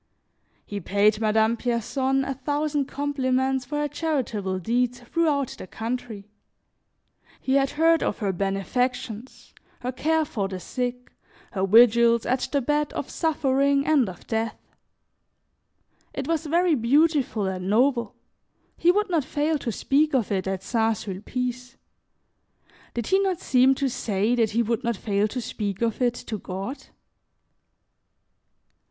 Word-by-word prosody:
He 205 Hz, -, -5 dB
paid 205 Hz, +3 st, +2 dB
Madame 220 Hz, +1 st, +3 dB
Pierson 260 Hz, +3 st, 0 dB
a 275 Hz, -, -2 dB
thousand 290 Hz, +2 st, -1 dB
compliments 265 Hz, -2 st, 0 dB
for 295 Hz, +3 st, -4 dB
her 295 Hz, 0 st, 0 dB
charitable 260 Hz, -, -2 dB
deeds 245 Hz, +6 st, 0 dB
throughout 285 Hz, 0 st, 0 dB
the -, -, -8 dB
country; 225 Hz, -2 st, -5 dB, 1.1 s
he 265 Hz, -, -1 dB
had 275 Hz, 0 st, +3 dB
heard 330 Hz, +1 st, +4 dB
of -, -, -1 dB
her 200 Hz, -4 st, -1 dB
benefactions, 225 Hz, +5 st, -3 dB, 0.3 s
her 250 Hz, +1 st, -2 dB
care 315 Hz, +5 st, +1 dB
for 220 Hz, -10 st, -2 dB
the 190 Hz, -1 st, -6 dB
sick, 250 Hz, +5 st, -4 dB, 0.4 s
her 195 Hz, -1 st, -1 dB
vigils 235 Hz, +2 st, +5 dB
at 255 Hz, +1 st, 0 dB
the 280 Hz, -, +1 dB
bed 295 Hz, +2 st, 0 dB
of -, -, -5 dB
suffering 280 Hz, -3 st, +1 dB
and 285 Hz, -9 st, +3 dB
of 180 Hz, -, -11 dB
death. 225 Hz, -1 st, -2 dB, 1.6 s
It -, -, -3 dB
was 320 Hz, -1 st, -1 dB
very 340 Hz, +2 st, +3 dB
beautiful 275 Hz, -3 st, +2 dB
and 185 Hz, 0 st, -3 dB
noble; 235 Hz, 0 st, +2 dB, 0.6 s
he 345 Hz, -, +4 dB
would 415 Hz, +1 st, 0 dB
not 325 Hz, -4 st, +2 dB
fail 300 Hz, +2 st, -1 dB
to 240 Hz, -, -3 dB
speak 285 Hz, +6 st, +1 dB
of 235 Hz, -6 st, 0 dB
it 190 Hz, -1 st, -1 dB
at 190 Hz, -1 st, -3 dB
St. 225 Hz, 0 st, +1 dB
Sulpice. 250 Hz, +6 st, -5 dB, 1.2 s
Did 235 Hz, -2 st, -2 dB
he 385 Hz, -, +3 dB
not 385 Hz, -3 st, 0 dB
seem 260 Hz, +1 st, +4 dB
to 275 Hz, -, 0 dB
say 215 Hz, -2 st, 0 dB
that 230 Hz, -3 st, +2 dB
he 230 Hz, +3 st, +1 dB
would 230 Hz, 0 st, -1 dB
not 235 Hz, -3 st, -1 dB
fail 205 Hz, 0 st, 0 dB
to 250 Hz, -, -4 dB
speak 210 Hz, -3 st, -3 dB
of 230 Hz, +1 st, -1 dB
it 245 Hz, -1 st, +2 dB
to 215 Hz, -3 st, -6 dB
God? 195 Hz, +10 st, -6 dB
250 Hz, 145 wpm, -25 LUFS, 215-280 Hz, 1.6 s, vigils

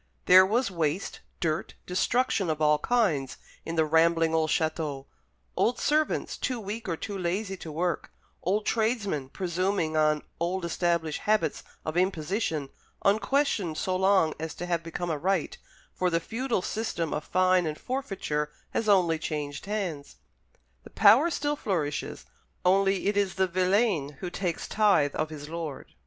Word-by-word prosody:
There 185 Hz, +1 st, +8 dB
was 230 Hz, +1 st, +1 dB
waste, 165 Hz, +1 st, -2 dB, 0.2 s
dirt, 160 Hz, -1 st, -2 dB
destruction 195 Hz, 0 st, +1 dB
of 155 Hz, -1 st, -1 dB
all 150 Hz, -1 st, +4 dB
kinds, 165 Hz, -, +1 dB, 0.3 s
in 165 Hz, -, -3 dB
the 160 Hz, -1 st, +3 dB
rambling 165 Hz, +1 st, +3 dB
old 160 Hz, -1 st, +2 dB
château; 155 Hz, -4 st, -1 dB, 0.5 s
old 240 Hz, -, +2 dB
servants, 305 Hz, +1 st, 0 dB
too 255 Hz, -3 st, -2 dB
weak 215 Hz, 0 st, -5 dB
or 165 Hz, -, -1 dB
too 205 Hz, +3 st, -5 dB
lazy 190 Hz, +2 st, -2 dB
to 160 Hz, -, -8 dB
work; 170 Hz, +2 st, -2 dB, 0.3 s
old 205 Hz, +4 st, 0 dB
tradesmen, 215 Hz, -, 0 dB
presuming 180 Hz, -1 st, -1 dB
on 155 Hz, -1 st, +2 dB, 0.2 s
old 175 Hz, +2 st, -1 dB
established 170 Hz, -2 st, 0 dB
habits 205 Hz, -8 st, +2 dB, 0.2 s
of 155 Hz, +2 st, -3 dB
imposition, 165 Hz, -4 st, 0 dB, 0.4 s
unquestioned 210 Hz, -, +1 dB
so 185 Hz, +3 st, -1 dB
long 190 Hz, -4 st, +3 dB
as 160 Hz, 0 st, -5 dB
to 175 Hz, -, -5 dB
have 170 Hz, -2 st, 0 dB
become 170 Hz, +1 st, -4 dB
a 150 Hz, -, -2 dB
right 185 Hz, 0 st, -1 dB, 0.3 s
for 185 Hz, -, 0 dB
the 165 Hz, -1 st, +1 dB
feudal 230 Hz, +2 st, -2 dB
system 190 Hz, -7 st, -2 dB
of 150 Hz, -, -2 dB
fine 185 Hz, -1 st, +2 dB
and 155 Hz, 0 st, -3 dB
forfeiture 195 Hz, -, -3 dB, 0.2 s
has 215 Hz, -, -1 dB
only 175 Hz, -5 st, +4 dB
changed 150 Hz, +1 st, -4 dB
hands. 185 Hz, -9 st, -3 dB, 0.7 s
The -, -, -12 dB
power 340 Hz, -, +6 dB
still 295 Hz, -2 st, -1 dB
flourishes, 165 Hz, -, -3 dB, 0.4 s
only 195 Hz, +1 st, +3 dB
it 205 Hz, -, +1 dB
is 200 Hz, -2 st, +1 dB
the 190 Hz, -, +3 dB
villein 185 Hz, -4 st, +1 dB
who 180 Hz, -, -5 dB
takes 175 Hz, -3 st, -3 dB
tithe 200 Hz, -9 st, +3 dB
of 155 Hz, 0 st, -1 dB
his 150 Hz, -2 st, -8 dB
lord. 160 Hz, -3 st, -6 dB
180 Hz, 155 wpm, -28 LUFS, 155-200 Hz, 0.7 s, There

